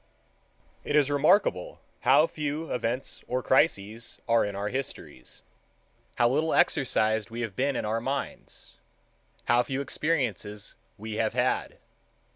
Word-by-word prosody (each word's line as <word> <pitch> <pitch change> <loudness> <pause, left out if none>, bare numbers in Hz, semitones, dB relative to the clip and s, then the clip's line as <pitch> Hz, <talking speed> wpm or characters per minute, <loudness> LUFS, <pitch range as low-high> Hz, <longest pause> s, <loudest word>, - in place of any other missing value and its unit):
It - - -1
is 145 -1 +4
remarkable 145 - +2 0.2
how 145 +4 +5
few 150 0 -4
events 125 +2 -3
or 125 0 -1
crises 115 -5 +1
there 115 - +3
are - - +4
in 105 -1 -3
our 100 +1 -2
histories, 125 - -6 0.7
how 120 - +4
little 155 +6 +1
exercised 110 -5 +2
we 115 +1 -5
have 110 -5 -4
been 135 +3 0
in - - -2
our 110 +2 -1
minds, 135 +3 -5 0.7
how 120 +1 +4
few 130 +2 -3
experiences 125 - -2 0.2
we 110 +1 -6
have 110 0 0
had. 125 +1 0
125 Hz, 135 wpm, -27 LUFS, 110-140 Hz, 0.7 s, how